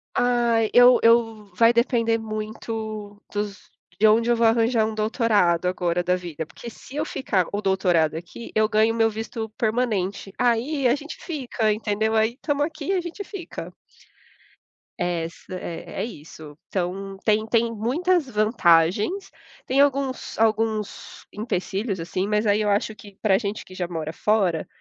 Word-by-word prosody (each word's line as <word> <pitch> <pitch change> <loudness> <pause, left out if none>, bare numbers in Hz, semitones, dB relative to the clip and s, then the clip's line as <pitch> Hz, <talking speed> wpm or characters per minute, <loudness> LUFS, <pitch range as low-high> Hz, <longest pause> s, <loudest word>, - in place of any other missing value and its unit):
Ai, 235 -2 +2
eu 245 0 +7
eu 225 -2 +3
vai 230 +3 +5
depender 230 -1 +2
muito 215 -1 -5
dos 205 -1 -5 0.3
de 220 - +6
onde 230 +2 +4
eu 240 - +4
vou 230 0 +2
arranjar 225 0 +3
um 220 - -3
doutorado 215 -6 +2
agora 180 -1 0
da 180 +1 +2
vida, 170 -3 -5
porque 235 - -10
se 255 +4 -13
eu 300 +1 -1
ficar 200 - 0
o 205 - -1
doutorado 180 -5 +2
aqui, 175 +8 -8
eu 215 0 +4
ganho 220 +1 +3
o - - -4
meu 225 0 +4
visto 220 0 -5
permanente, 215 -4 -1
aí 250 +3 +1
a 240 - +4
gente 295 +2 -8
fica, 250 - -2
entendeu? 220 +1 -1
Aí 220 +3 +2
tamo 290 -1 -1
aqui 300 -1 -5
e - - +3
a 370 - +1
gente 345 +4 -6
fica. 385 -3 -8 1.3
Essa, 175 0 -3
é 175 -2 -6
é - - -1
isso. 155 -7 -11
Então 195 +1 -3
tem 215 0 +2
tem 230 +1 +2
muitas 300 - +1
vantagens, 210 - +2 0.3
tem 265 +2 +3
alguns 275 -2 0
alguns 220 -1 -1
empecilhos, 200 -1 -2
assim, 185 +3 -2
mas 210 +1 +1
aí 210 +1 +3
eu 210 - +1
acho 205 +2 0
que 205 -2 -14
para 210 -3 +2
a - - +4
gente 210 -1 -4
que 185 - -13
já 180 -2 -3
mora 160 -2 -4
fora, 190 -5 +1
220 Hz, 165 wpm, -24 LUFS, 195-235 Hz, 1.3 s, eu